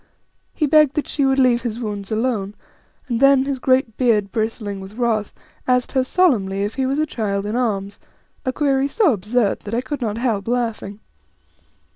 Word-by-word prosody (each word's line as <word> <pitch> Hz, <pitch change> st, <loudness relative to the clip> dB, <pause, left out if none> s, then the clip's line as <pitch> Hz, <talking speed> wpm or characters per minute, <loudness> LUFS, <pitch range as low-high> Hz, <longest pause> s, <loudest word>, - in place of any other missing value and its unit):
He 305 Hz, -, +1 dB
begged 300 Hz, -1 st, +4 dB
that 300 Hz, -, -1 dB
she 280 Hz, -, 0 dB
would 270 Hz, 0 st, +2 dB
leave 250 Hz, -2 st, +3 dB
his 235 Hz, -1 st, -4 dB
wounds 205 Hz, -4 st, -5 dB
alone, 215 Hz, -3 st, -1 dB, 0.5 s
and 235 Hz, -3 st, -1 dB
then, 275 Hz, 0 st, +5 dB
his 275 Hz, -2 st, -2 dB
great 255 Hz, -3 st, +1 dB
beard 215 Hz, -6 st, +2 dB
bristling 215 Hz, -2 st, -3 dB
with 190 Hz, +2 st, -10 dB
wrath, 225 Hz, -4 st, 0 dB, 0.4 s
asked 250 Hz, -1 st, +2 dB
her 260 Hz, -2 st, +2 dB
solmenly 225 Hz, -, +1 dB
if 205 Hz, +2 st, -2 dB
he 265 Hz, -1 st, -1 dB
was 270 Hz, +2 st, -1 dB
a 310 Hz, -, +2 dB
child 205 Hz, -7 st, -2 dB
in 210 Hz, +2 st, -3 dB
arms, 205 Hz, -5 st, -2 dB, 0.4 s
a 260 Hz, -, -1 dB
query 275 Hz, -1 st, +1 dB
so 345 Hz, -, +2 dB
absurd 210 Hz, +2 st, 0 dB
that 210 Hz, +2 st, -5 dB
I 240 Hz, -, +1 dB
could 285 Hz, +1 st, -5 dB
not 220 Hz, -2 st, -2 dB
help 225 Hz, -5 st, -1 dB
laughing. 225 Hz, -4 st, -2 dB
240 Hz, 185 wpm, -20 LUFS, 210-265 Hz, 0.5 s, then